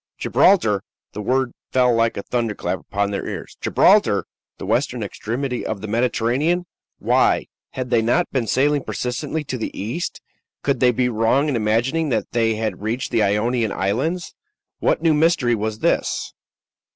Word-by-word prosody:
Gibraltar! 110 Hz, -, +3 dB, 0.3 s
The 105 Hz, -, -5 dB
word 130 Hz, +3 st, 0 dB, 0.2 s
fell 125 Hz, -1 st, +3 dB
like 115 Hz, 0 st, +1 dB
a 100 Hz, -, -4 dB
thunderclap 115 Hz, -4 st, -2 dB
upon 100 Hz, 0 st, -2 dB
their 100 Hz, -, -3 dB
ears. -, -, -6 dB
Gibraltar! -, -, +4 dB, 0.3 s
the -, -, -7 dB
western -, -, 0 dB
extremity 125 Hz, +3 st, -3 dB
of 110 Hz, -, -3 dB
the 110 Hz, -, -5 dB
Mediterranean! 125 Hz, -, +1 dB, 0.3 s
Why, -, -, +2 dB, 0.3 s
had 130 Hz, -1 st, -4 dB
they 115 Hz, -2 st, +4 dB
not 120 Hz, +11 st, +2 dB
been 125 Hz, -4 st, -1 dB
sailing 145 Hz, +3 st, +2 dB
persistently 145 Hz, +5 st, -3 dB
to 130 Hz, -3 st, -5 dB
the -, -, -5 dB
east? 115 Hz, -, -3 dB, 0.4 s
Could 140 Hz, -3 st, +1 dB
they 125 Hz, 0 st, +5 dB
be 125 Hz, +1 st, +1 dB
wrong 120 Hz, +6 st, +2 dB
in 140 Hz, -, 0 dB
imagining 120 Hz, +9 st, +1 dB
that 115 Hz, -, -1 dB
they 115 Hz, -1 st, +1 dB
had 110 Hz, -4 st, -3 dB
reached 110 Hz, +4 st, -2 dB
the 115 Hz, -2 st, +2 dB
Ionian 110 Hz, +2 st, +1 dB
Islands? 135 Hz, -, -1 dB, 0.5 s
What -, -, +1 dB
new 165 Hz, -2 st, +4 dB
mystery 150 Hz, -5 st, +3 dB
was 110 Hz, -1 st, -2 dB
this? -, -, 0 dB
120 Hz, 160 wpm, -21 LUFS, 110-135 Hz, 0.5 s, they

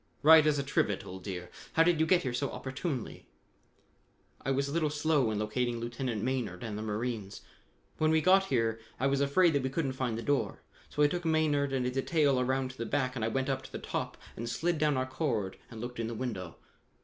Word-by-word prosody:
"Right 155 Hz, 0 st, +8 dB
as 150 Hz, -1 st, +3 dB
a 140 Hz, -, 0 dB
trivet, 105 Hz, -7 st, 0 dB
old 95 Hz, 0 st, -8 dB
dear. 90 Hz, -3 st, -6 dB, 0.2 s
How 165 Hz, -, +5 dB
did 170 Hz, -1 st, +3 dB
you 160 Hz, -, +3 dB
get 180 Hz, +1 st, +4 dB
here 130 Hz, -3 st, -2 dB
so 135 Hz, +3 st, -1 dB
opportunely?" 130 Hz, -1 st, -5 dB, 1.2 s
"I -, -, -2 dB
was 135 Hz, +1 st, +1 dB
a -, -, -4 dB
little 155 Hz, -1 st, +1 dB
slow 150 Hz, -4 st, +2 dB
in 110 Hz, -, -1 dB
locating 120 Hz, +3 st, -1 dB
Lieutenant 120 Hz, -2 st, -3 dB
Maynard 125 Hz, -8 st, -2 dB
and 110 Hz, -3 st, -4 dB
the 105 Hz, -, -4 dB
marines. 110 Hz, -1 st, -3 dB, 0.6 s
When 155 Hz, -, +3 dB
we 160 Hz, 0 st, +4 dB
got 190 Hz, +4 st, +5 dB
here 115 Hz, -, 0 dB, 0.2 s
I 130 Hz, -, +1 dB
was 140 Hz, 0 st, +2 dB
afraid 160 Hz, +5 st, +4 dB
that 140 Hz, -, +2 dB
we 130 Hz, -, -1 dB
couldn't 135 Hz, 0 st, -1 dB
find 125 Hz, -4 st, -2 dB
the 115 Hz, -, -4 dB
door, 145 Hz, -1 st, 0 dB, 0.3 s
so 150 Hz, -, +1 dB
I -, -, +7 dB
took 175 Hz, +4 st, -3 dB
Maynard 155 Hz, -3 st, +2 dB
and 130 Hz, -2 st, 0 dB
a 125 Hz, -, 0 dB
detail 140 Hz, 0 st, +2 dB
around 130 Hz, +1 st, 0 dB
to 130 Hz, -, -18 dB
the 115 Hz, -, -2 dB
back 130 Hz, 0 st, 0 dB
and 115 Hz, -, -2 dB
I -, -, +2 dB
went 130 Hz, +3 st, -1 dB
up 135 Hz, -1 st, -1 dB
to -, -, -12 dB
the -, -, -4 dB
top -, -, -4 dB, 0.2 s
and 115 Hz, +1 st, -4 dB
slid 165 Hz, +7 st, 0 dB
down 150 Hz, -2 st, +2 dB
our 130 Hz, -, +1 dB
cord 125 Hz, -, -2 dB
and 115 Hz, -, -9 dB
looked 120 Hz, +1 st, -6 dB
in 115 Hz, -, -1 dB
the 115 Hz, -, -4 dB
window. 100 Hz, -9 st, -4 dB
130 Hz, 235 wpm, -31 LUFS, 115-150 Hz, 1.2 s, Right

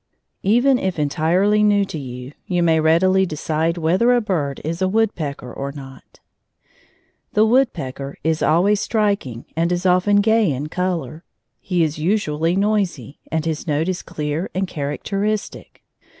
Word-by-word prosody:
Even 245 Hz, +6 st, +3 dB
if 190 Hz, -2 st, -2 dB
entirely 170 Hz, +8 st, +2 dB
new 205 Hz, -1 st, +3 dB
to 160 Hz, -, -6 dB
you, 125 Hz, -1 st, -8 dB, 0.2 s
you 175 Hz, -2 st, +1 dB
may 160 Hz, -1 st, +3 dB
readily 180 Hz, +5 st, +3 dB
decide 160 Hz, 0 st, -1 dB
whether 185 Hz, +9 st, +3 dB
a -, -, +3 dB
bird 160 Hz, -, -2 dB
is 165 Hz, +3 st, -4 dB
a 190 Hz, -, +3 dB
woodpecker 170 Hz, -, -1 dB
or 140 Hz, 0 st, -4 dB
not. 135 Hz, -2 st, -12 dB, 1.1 s
The 215 Hz, +1 st, +4 dB
woodpecker 140 Hz, -, 0 dB
is 160 Hz, 0 st, 0 dB
always 195 Hz, +6 st, +3 dB
striking 200 Hz, -, -1 dB
and 165 Hz, +2 st, +1 dB
is 180 Hz, +1 st, -1 dB
often 185 Hz, +3 st, +3 dB
gay 220 Hz, -2 st, +3 dB
in 140 Hz, +3 st, -4 dB
color. 165 Hz, -4 st, -3 dB, 0.4 s
He 180 Hz, -3 st, 0 dB
is 155 Hz, -1 st, -2 dB
usually 165 Hz, -2 st, 0 dB
noisy, 195 Hz, -, -1 dB
and 160 Hz, -1 st, -1 dB
his 160 Hz, +1 st, -3 dB
note 155 Hz, +2 st, 0 dB
is 185 Hz, -, -2 dB
clear 150 Hz, +4 st, -4 dB
and 190 Hz, +1 st, 0 dB
characteristic. 195 Hz, +9 st, -4 dB
170 Hz, 150 wpm, -20 LUFS, 150-200 Hz, 1.1 s, The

